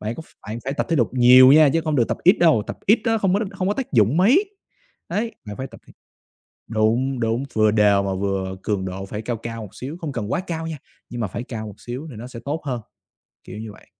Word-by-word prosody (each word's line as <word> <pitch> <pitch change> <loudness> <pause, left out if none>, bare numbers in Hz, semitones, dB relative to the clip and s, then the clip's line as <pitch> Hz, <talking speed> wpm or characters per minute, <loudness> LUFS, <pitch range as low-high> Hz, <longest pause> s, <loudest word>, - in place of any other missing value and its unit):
Bạn 110 +2 -3
có - - -8
ph - - -22 0.2
bạn 110 - -4
phải 135 - -2
tập - - -2
thể 165 - +1
lục 120 - +2
nhiều 130 +1 +8
nha, 155 0 +7
chứ 165 - +2
hông 155 -2 0
được 120 - +2
tập - - -1
ít 185 +5 +5
đâu, 160 -11 +5
tập - - -6
ít 215 +4 +5
á 225 -2 +2
không 195 -3 +1
có - - +3
đ - - 0
không 190 -1 -2
có 205 - +1
tác 265 - -5
dụng 115 +3 +3
mấy. 275 - +4 0.6
Đấy, 225 +2 -2
bạn 105 -1 -7
phải 130 - -4
tập - - -14
thể - - -17 0.8
đúng, 120 +4 +1
đúng, 115 +2 0
vừa 110 -1 +3
đều 105 -2 +4
mà 95 - -2
vừa 95 -1 -2
cường 100 -3 -1
độ 95 +1 -5
phải 105 +2 -6
cao 120 +1 -3
cao 115 0 -6
một 105 -3 -10
xíu, 140 +6 -7
không 155 - -3
cần 115 -5 -4
quá - - +1
cao 165 -1 -3
nha, 160 - -5 0.3
nhưng 120 -1 -5
mà 110 - 0
phải 115 +6 -5
cao 110 -3 -6
một 100 - -10
xíu 125 +6 -7
thì - - -10
nó 115 +3 -8
sẽ 125 -2 -9
tốt 150 +4 -3
hơn, 125 -4 -3 0.6
kiểu 95 - -9
như 110 -1 -7
vậy. - - -18
120 Hz, 275 wpm, -22 LUFS, 110-160 Hz, 0.8 s, nhiều